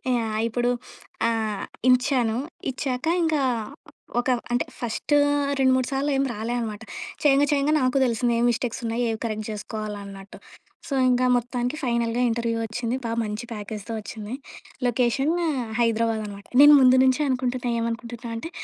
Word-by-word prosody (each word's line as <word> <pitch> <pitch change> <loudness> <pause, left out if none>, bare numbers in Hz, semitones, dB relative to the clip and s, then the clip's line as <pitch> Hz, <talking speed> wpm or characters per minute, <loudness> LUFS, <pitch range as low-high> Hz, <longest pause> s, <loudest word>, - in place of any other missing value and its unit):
Yeah! 220 -2 -1
ఇప్పుడు 240 +2 0 0.6
ఆహ్, 220 -3 -2 0.2
ఇచ్చాను. 250 -3 +3 0.3
ఇచ్చాక 255 0 -3 0.2
ఇంకా 315 -3 +1 0.8
ఒక 245 - -1 0.2
అంటే 245 - +1
ఫస్ట్ 240 +5 -2 0.5
రెండు 260 -1 +4
మూడు 255 -1 0
సార్లు 275 +2 0
ఏం 270 - +2
రాలేనమాట. 225 0 -3 0.4
చేయంగా 285 -1 +5
చేయంగా 290 +1 +2
నాకు 255 +1 +2
తెలిసింది 235 0 +1
ఏం - - +2
మిస్టేక్స్ 235 0 -2
ఉన్నాయి, 230 +2 -1
ఏవి 220 -1 -2
కరెక్ట్ 215 -2 -3
చేసుకోవాలన్నట్టు. 205 -2 -7 0.5
సో, 295 - -4 0.2
ఇంకా 250 0 +3
మొత్తానికి 245 +2 -2
ఫైనల్‌గా 235 -1 0
ఇంటర్వ్యూ 230 0 -1
వచ్చింది. 230 +2 -3
బాగా 230 0 -2
మంచి 210 +1 -4
ప్యాకేజ్‌తో 210 +1 -6
వచ్చింది. 215 +1 -7 0.5
లొకేషన్ 250 +4 +1 0.5
హైదరాబాద్ 230 -1 +1
అనమాట. 200 -1 -9 0.2
నేను 295 +1 +10
ముందు 255 0 +7
నుంచే 260 +2 +3
అనుకుంటున్నా. 250 -1 -1
ఏమనుకుంటున్నా 235 +1 -4
అంటే 285 +9 -5
235 Hz, 140 wpm, -24 LUFS, 220-255 Hz, 0.8 s, నేను